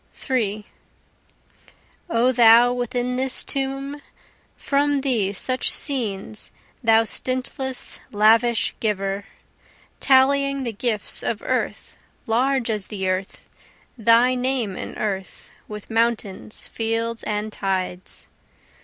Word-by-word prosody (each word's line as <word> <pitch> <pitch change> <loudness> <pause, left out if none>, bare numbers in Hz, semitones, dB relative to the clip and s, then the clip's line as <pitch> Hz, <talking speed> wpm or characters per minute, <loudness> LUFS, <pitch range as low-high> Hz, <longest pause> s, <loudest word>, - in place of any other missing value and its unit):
3 215 -5 -2 1.4
O 245 -2 +3
thou 240 0 +6
within 245 0 -2
this 260 0 +2
tomb, 275 +1 -3 0.6
From 285 0 +1
thee 235 -8 +1
such 255 +6 +2
scenes, 215 -6 -1 0.3
thou 225 0 +5
stintless, 255 +2 -2
lavish 225 +2 +3
giver, 200 -2 -2 0.7
Tallying 275 +1 +3
the 235 -3 -3
gifts 215 0 -1
of - - -3
earth, - - -3 0.3
large 250 +1 +1
as 210 -3 -3
the 190 -3 -4
earth, 185 +1 -3 0.5
Thy 235 +2 +4
name 250 -5 -1
an - - -7
earth, 195 -3 -4 0.2
with 210 +1 -9
mountains, 225 -3 -1
fields 230 0 -2
and 210 0 -3
tides. 185 -2 -4
230 Hz, 100 wpm, -22 LUFS, 210-260 Hz, 1.4 s, thou